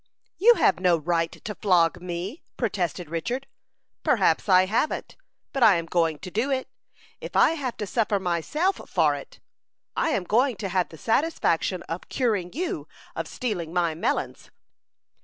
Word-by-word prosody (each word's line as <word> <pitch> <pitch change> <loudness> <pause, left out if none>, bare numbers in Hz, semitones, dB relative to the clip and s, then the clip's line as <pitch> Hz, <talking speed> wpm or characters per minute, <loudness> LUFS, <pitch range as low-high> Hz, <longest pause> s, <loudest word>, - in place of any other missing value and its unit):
"You 470 +5 +7
have - - +3
no 180 -2 +4
right 165 +1 0
to 210 - -7
flog 175 -4 +2
me," 180 - -5 0.2
protested 185 - -2
Richard. 240 - -3 0.6
"Perhaps - - +2
I 185 0 +6
haven't; 225 +10 -1 0.4
but 270 - -2
I'm 190 -8 +5
going 165 -2 +1
to 185 - -7
do 230 +8 0
it, 265 -1 -1 0.5
if - - -8
I - - +6
have 275 -7 -3
to 210 - -3
suffer 210 -1 0
myself 190 - 0
for - - +3
it. - - -9 0.6
I - - +1
am 205 - 0
going 240 +7 +2
to 195 -1 -4
have 185 -1 0
the 160 - -12
satisfaction 225 - 0
of 165 +2 -6
curing 210 -9 0
you 350 +7 -3 0.3
of - - -3
stealing 180 - -4
my 175 -2 +1
melons." 160 - -2
190 Hz, 160 wpm, -25 LUFS, 170-250 Hz, 0.6 s, You